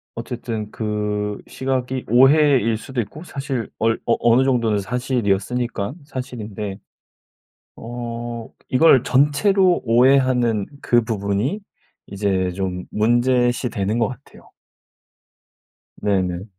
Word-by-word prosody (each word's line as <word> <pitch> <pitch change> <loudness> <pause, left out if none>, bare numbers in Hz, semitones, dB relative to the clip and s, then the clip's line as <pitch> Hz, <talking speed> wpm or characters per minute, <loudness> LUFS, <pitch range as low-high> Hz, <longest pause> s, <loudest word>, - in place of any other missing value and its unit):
어쨌든 115 -2 -5
그 105 -1 -2
시각이 130 -1 -3
오해일 130 -2 +5
수도 130 +3 -6
있고 145 +9 -9
사실 135 - -4
얼 115 0 +1
어 115 - +3
어느 120 +2 +4
정도는 115 -5 +1
사실이었으니깐 120 0 -1
사실인데. 110 -8 -6 1.0
어. 120 0 -6 0.2
이걸 130 -1 +5
전체로 175 +7 +3
오해하는 125 -3 +3
그 120 0 +3
부분이 110 - -1 0.5
이제 95 -2 -1
좀 90 -1 -4
문제시되는 120 -2 +1
것 115 - +2
같아요. 130 +2 -13 1.5
네네. 95 -3 -1
120 Hz, 225 characters per minute, -21 LUFS, 105-130 Hz, 1.5 s, 오해일